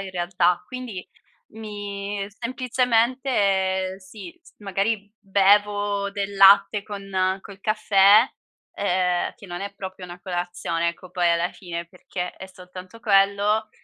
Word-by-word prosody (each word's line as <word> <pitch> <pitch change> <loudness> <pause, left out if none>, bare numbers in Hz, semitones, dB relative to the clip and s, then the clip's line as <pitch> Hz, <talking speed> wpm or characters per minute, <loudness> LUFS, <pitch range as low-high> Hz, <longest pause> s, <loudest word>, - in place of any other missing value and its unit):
in 195 -1 -6
realtà, 175 0 +1
quindi 250 -7 -7 0.5
mi 205 -2 -5
semplicemente 230 -5 0
sì 215 - -12
s - - -21
magari 205 +1 -2
bevo 205 +1 +2
del 200 0 -4
latte 200 +1 +6
con 195 -2 -2
col 195 0 -13
caffè, 215 0 +5 0.5
ehm, 180 -2 0
che 215 -5 -14
non 175 +1 -6
è 200 0 -6
proprio 190 -1 -8
una 175 0 -10
colazione, 175 -2 -2
ecco, 170 +1 -8
poi 175 -1 +1
alla 170 +1 +1
fine, 170 -2 -6
perché 180 0 -6
è 190 - -9
soltanto 185 +2 -12
quello, 205 +1 +2
195 Hz, 125 wpm, -24 LUFS, 185-210 Hz, 0.5 s, latte